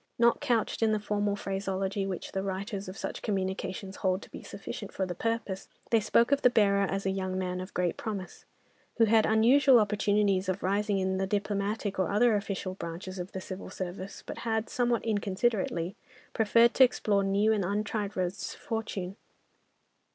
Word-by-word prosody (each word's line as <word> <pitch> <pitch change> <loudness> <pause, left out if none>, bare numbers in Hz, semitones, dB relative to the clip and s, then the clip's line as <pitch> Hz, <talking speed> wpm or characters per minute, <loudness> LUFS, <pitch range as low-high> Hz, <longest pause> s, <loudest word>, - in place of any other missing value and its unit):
Not 235 0 +4
couched 235 -2 0
in 220 -1 +3
the 215 - +1
formal 205 0 0
phraseology 195 0 -2
which 185 -2 -5
the 190 - -2
writers 195 0 -4
of 185 - -8
such - - -5
communications 190 0 -3
hold 190 +1 0
to - - -14
be - - -8
sufficient - - -7
for 190 - -1
the 180 - -4
purpose, 215 -1 -3 0.2
they 230 - +5
spoke 230 +4 +3
of 280 0 +3
the 250 - +6
bearer 200 -4 +3
as 195 0 -2
a 190 - +2
young 185 -1 -2
man 180 -1 -2
of 185 - -9
great 180 -1 0
promise, 200 -5 -6 0.5
who 230 - +6
had 220 0 +4
unusual 245 +4 +6
opportunities 205 -2 +2
of 185 +1 -2
rising 200 +2 +1
in 190 0 0
the 190 - 0
diplomatic 205 0 -1
or 185 - +1
other 220 +2 +4
official 195 -2 -3
branches 185 +1 -6
of 180 +2 -6
the 190 - -3
Civil 185 0 -7
Service, 185 +1 -6
but - - -7
had, 220 -1 -1
somewhat 240 -2 +1
inconsiderately, 200 -3 0 0.4
preferred 230 +2 +4
to 265 - +7
explore 210 -5 +2
new 200 +3 +3
and 205 -3 0
untried 205 +1 -2
roads 185 +1 -2
to - - -14
fortune. 205 -4 -4
200 Hz, 180 wpm, -29 LUFS, 190-220 Hz, 0.5 s, to